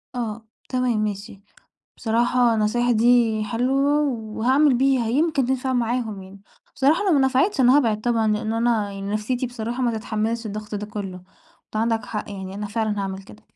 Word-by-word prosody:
آه، 225 -2 -4 0.2
تمام 250 -4 0
ماشي. 200 -1 -5 0.6
بصراحة 240 +1 +2
النصايح 225 +3 +1
دي 230 -1 +3
حلوة 270 +6 +1
وهاعمل 250 +4 +1
بيها 260 -1 +2
يمكن 285 +3 +1
تِنفَع 260 0 -1
معاهم 235 -4 -1
يعني. 190 +1 -13 0.3
بصراحة 300 +8 +2
لو 375 - +4
ما 285 - +4
نفعتش 270 +7 +1
أنا 255 +2 +6
هابعد 225 -7 +2
طبعًا، 230 -1 +1
لأنّ 215 +1 -2
أنا 225 -3 0
يعني 195 0 -6
نفسيتي 240 +4 -1
بصراحة 240 +1 -4
ما 240 -1 +1
تتحمّلش 225 +1 -2
الضَّغط 215 0 -6
ده 210 0 -4
كُلّه، 195 -4 -6 0.5
فعندَك 225 0 0
حَقّ 210 - -5
يَعني 190 -1 -7
أنا 210 +1 -4
فِعلًا 215 0 -2
هاعمل 195 -1 -4
كده. 210 +2 -16
230 Hz, 165 wpm, -23 LUFS, 210-250 Hz, 0.6 s, أنا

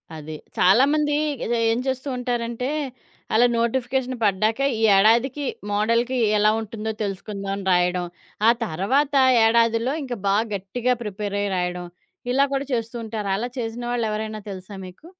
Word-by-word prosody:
అది. 155 0 -7 0.2
చాలామంది 290 +9 +4 0.3
ఏదో 240 - 0 0.2
ఏం 230 - 0
చేస్తూ 260 +1 -2
ఉంటారంటే 240 0 -2 0.7
అలా 240 - +6
నోటిఫికేషన్ 255 +2 -1
పడ్డాక 215 +4 +1 0.2
ఈ - - -3
ఏడాదికి, 235 +8 +3 0.3
మోడల్‌కి 230 +5 +1 0.2
ఎలా 210 +1 +4
ఉంటుందో 220 0 -5
తెలుసుకుందామని 195 0 -4
రాయడం, 180 0 +2 0.4
ఆ - - +8 0.2
తర్వాత 255 - 0 0.3
ఏడాదిలో 230 +2 +3
ఇంక 255 -2 -5
బాగా 205 +3 +2
గట్టిగా 230 +6 -1
ప్రిపేరయి 205 -1 -3
రాయడం, 180 0 -2 0.5
ఇలా 275 +1 +4
కూడా 275 0 -1
చేస్తూ 230 0 -2
ఉంటారు. 215 -2 -4
అలా 240 +3 -3
చేసిన 230 +1 -4
వాళ్ళు 235 -2 0
ఎవరైనా 215 0 -4
తెలుసా 190 +1 -9
మీకు? 180 - -15
225 Hz, 135 wpm, -23 LUFS, 200-245 Hz, 0.7 s, ఆ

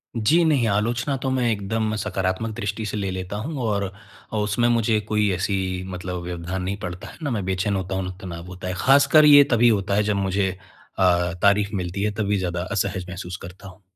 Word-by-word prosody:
जी 120 +10 +3
नहीं, 140 -7 +3
आलोचना 115 +6 0
तो 130 - 0
मैं 125 -2 +1
एकदम 110 +1 -1
सकारात्मक 95 +1 -2
दृष्टि 105 -1 -3
से 105 - -3
ले 100 -2 -2
लेता 95 +2 -5
हूँ 145 +8 -4
और 100 -4 -1 0.5
उसमें 105 +3 +1
मुझे 115 -2 +2
कोई 105 -1 +2
ऐसी 95 -1 -2
मतलब 90 0 -5
व्यवधान 90 +1 -4
नहीं 95 +2 -2
पड़ता 90 0 -6
है - - -12
ना 145 - -1
मैं 110 -5 -1
बेचैन 95 +2 0
होता 95 0 -3
हूँ 95 -1 -4
तनाव 85 -2 -7
होता 90 0 -7
है। 90 - -2
ख़ासकर 140 +3 +5
ये 145 -1 +9
तभी 120 0 +5
होता 100 -3 +1
है 105 - +3
जब 105 0 0
मुझे 95 0 0 0.5
अ, 90 -2 +3
तारीफ 100 0 +4
मिलती 95 +1 -3
है, 105 - +1
तभी 105 -2 +1
ज़्यादा 90 -2 -2
असहज 95 -2 -1
महसूस 90 0 -6
करता 90 +2 -11
हूँ। 95 +1 -14
100 Hz, 200 wpm, -23 LUFS, 95-110 Hz, 0.5 s, ये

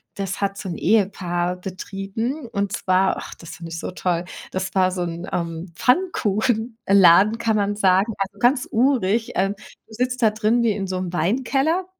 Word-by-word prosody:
Das 195 0 -4
hat 200 0 -1
so 195 - -6
'n 175 - -4
Ehepaar 180 -4 +1
betrieben 195 - -5
und 200 -1 -2
zwar 185 +1 +2
ach, - - -8
das 165 -2 -10
fand 165 0 -9
ich 165 0 -5
so - - -5
toll, 180 -1 -1 0.3
das 190 +1 -4
war 185 -1 +3
so 180 -1 -2
'n, 170 0 -5
ähm, 170 0 -4
Pfannkuchenladen, 220 - +3
kann 225 -2 0
man 205 0 0
sagen, 195 +2 +3
also, 195 +1 -4
ganz 255 +3 +2
urig. 230 -3 +1
Äh, 195 +1 +2
du 205 +2 -14
sitzt 250 +2 -2
da 220 -2 +5
drin 220 +3 +1
wie 225 -3 +2
in 195 -1 -3
so'm 185 -1 -4
Weinkeller. 270 - +1
200 Hz, 175 wpm, -22 LUFS, 185-230 Hz, 0.3 s, da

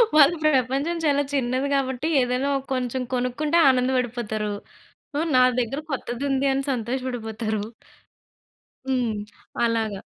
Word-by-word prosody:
వాళ్ళ 295 +1 +8
ప్రపంచం 275 +4 +2
చాలా 285 -1 +3
చిన్నది 260 +1 0
గాబట్టి 265 +1 0
ఏదన్నా 250 +3 0
ఓ - - -2
కొంచెం 255 0 -2
కొనుక్కుంటే 255 +6 0
ఆనందపడిపోతారు. 245 -5 0 0.6
హ్మ్. 320 +3 0
నా 255 - +7 0.2
దగ్గర 250 +4 -3
కొత్తది 250 0 -4
ఉంది 270 +1 +1
అని 270 +1 -1
సంతోషపడిపోతారు. 230 -3 -3 1.3
హ్మ్. 250 -4 0 0.5
అలాగా. 220 -4 -1
255 Hz, 110 wpm, -24 LUFS, 235-275 Hz, 1.3 s, వాళ్ళ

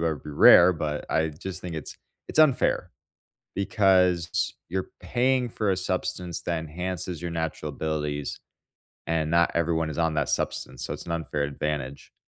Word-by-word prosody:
would 80 -4 -1
be 75 - -8
rare, 85 +5 +8
but 75 -3 -3
I 80 0 +2
just 85 +5 -7
think 90 -2 -6
it's 80 - -6 0.3
it's - - -3
unfair, 155 -5 +3 0.6
because 95 -4 +2
you're 95 +2 -3
paying 125 +7 +1
for 105 -3 -1
a 95 - +1
substance 90 -2 -3
that 85 -1 -1
enhances 90 +1 -5
your 85 - -3
natural 80 -2 -3
abilities, 75 -1 -3 0.7
and 80 -1 0
not 85 +1 +4
everyone 80 -1 +1
is - - -6
on 80 -1 +1
that 75 -3 0
substance, - - -2
so - - -3
it's - - -7
an 85 - -3
unfair 75 -3 -2
advantage. 70 -1 -4
85 Hz, 160 wpm, -26 LUFS, 75-90 Hz, 0.7 s, rare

